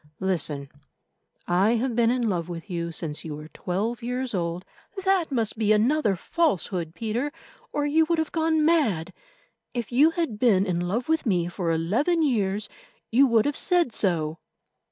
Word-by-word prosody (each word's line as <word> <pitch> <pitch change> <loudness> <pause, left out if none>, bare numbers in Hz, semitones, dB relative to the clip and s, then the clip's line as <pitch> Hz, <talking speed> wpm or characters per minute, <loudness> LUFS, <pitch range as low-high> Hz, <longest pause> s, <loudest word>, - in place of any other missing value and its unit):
Listen. 160 -7 -2 0.8
I 195 +6 +3
have 240 +1 -1
been 230 -1 +3
in 245 -1 +1
love 175 -4 -1
with 175 +3 -7
you 170 -1 -2
since 155 -2 -4
you 155 -2 -5
were 150 +1 -10
twelve 210 +9 -3
years 250 +1 -3
old—" 175 -1 -2 0.4
"That 380 -5 +2
must 225 -4 -1
be 215 -1 +2
another 220 0 +3
falsehood, 180 - -1
Peter, 235 +6 -2 0.4
or 290 - -1
you 315 +2 +3
have 320 -1 -1
gone 320 -1 +2
mad. 215 - +2 0.6
If 235 -4 -3
you 280 +6 +5
had 330 -11 -2
been 205 -6 +4
in 180 -3 -1
love 230 +7 -2
with 320 -4 +1
me 175 -5 +1
for 175 -1 -3
eleven 220 - +1
years, 210 -6 0 0.4
you 265 +4 +5
would 230 -3 +3
have 290 -1 0
said 350 - +1
so." 165 -6 0
220 Hz, 165 wpm, -25 LUFS, 175-280 Hz, 0.8 s, you